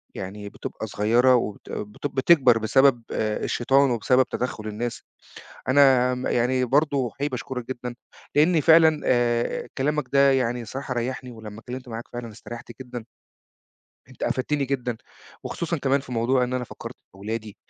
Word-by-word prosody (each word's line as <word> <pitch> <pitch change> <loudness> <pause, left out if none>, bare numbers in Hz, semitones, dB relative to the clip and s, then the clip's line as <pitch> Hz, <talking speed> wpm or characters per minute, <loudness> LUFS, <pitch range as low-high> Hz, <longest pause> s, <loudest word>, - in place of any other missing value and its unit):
يعني 100 +2 -6
بتبقى 110 - -7
صغيرة 120 +5 +3
وبت 105 -4 -3
بتب 105 +7 -5
بتكبر 130 -4 +5
بسبب 120 +2 +3
آآ 110 -1 -1
الشيطان 135 +2 +2
وبسبب 125 +3 +3
تدخُّل 120 -3 -3
الناس. 115 +3 -4 0.7
أنا 130 -2 +5
م 125 0 -5
يعني 125 +2 +1
برضه 140 -1 +1
حقيقي 140 +3 -2
باشكرك 125 -2 -5
جدًا 125 -1 -5 0.4
لإنّي 160 +2 +4
فعلًا 160 -1 +6
آآ 120 -1 +1
كلامك 150 +2 0
ده 140 0 +5
يعني 125 -2 0
الصراحة 130 +3 -5
ريّحني 125 +1 -3
ولمّا 110 -2 -10
اتكلِّمت 125 +1 -8
معاك 115 0 -6
فعلًا 120 -2 -6
استريّحت 120 +2 -10
جدًا. 120 -3 -7 1.0
أنت - - -15
أفدتني 140 +2 0
جدًا 125 -3 -2 0.5
وخصوصًا 170 0 -3
كمان 140 0 +1
في 130 -2 -10
موضوع 125 +2 +2
إن 125 - -4
أنا 125 -1 -1
فكّرت - - -9
في - - -50
أولادي، 105 +1 -6
125 Hz, 155 wpm, -24 LUFS, 115-135 Hz, 1.0 s, فعلًا